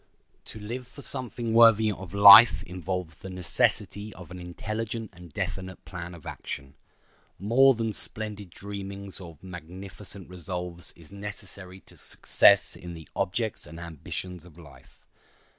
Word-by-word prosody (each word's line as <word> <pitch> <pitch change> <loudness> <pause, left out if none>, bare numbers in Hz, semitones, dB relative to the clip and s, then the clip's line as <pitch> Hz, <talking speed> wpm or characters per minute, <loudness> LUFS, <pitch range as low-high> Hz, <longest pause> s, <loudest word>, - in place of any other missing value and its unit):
To 110 - -9
live 120 +4 -6
for 140 +2 -12
something 120 -3 -2
worthy 115 -2 +6
of 95 -3 -8
life 100 +3 +10
involves 90 -1 -4
the 95 - -9
necessity 95 +3 -1
of 90 -3 -12
an 90 - -8
intelligent 110 +5 -5
and 90 -2 -13
definite 95 +2 -5
plan 85 -1 -7
of 80 - -15
action. 70 -1 -7 0.6
More 130 +6 +5
than 115 -1 -2
splendid 105 -2 -6
dreamings 100 +1 -8
or 85 -3 -10
magnificent 95 +2 -8
resolves 90 -1 -3
is 85 0 -18
necessary 100 -2 -9
to - - -16
success - - +4
in 85 -1 -9
the 80 -1 -11
objects 110 0 -2
and 80 +2 -10
ambitions 85 +2 -6
of 85 -3 -15
life. 80 -4 -17
95 Hz, 140 wpm, -27 LUFS, 90-105 Hz, 0.6 s, life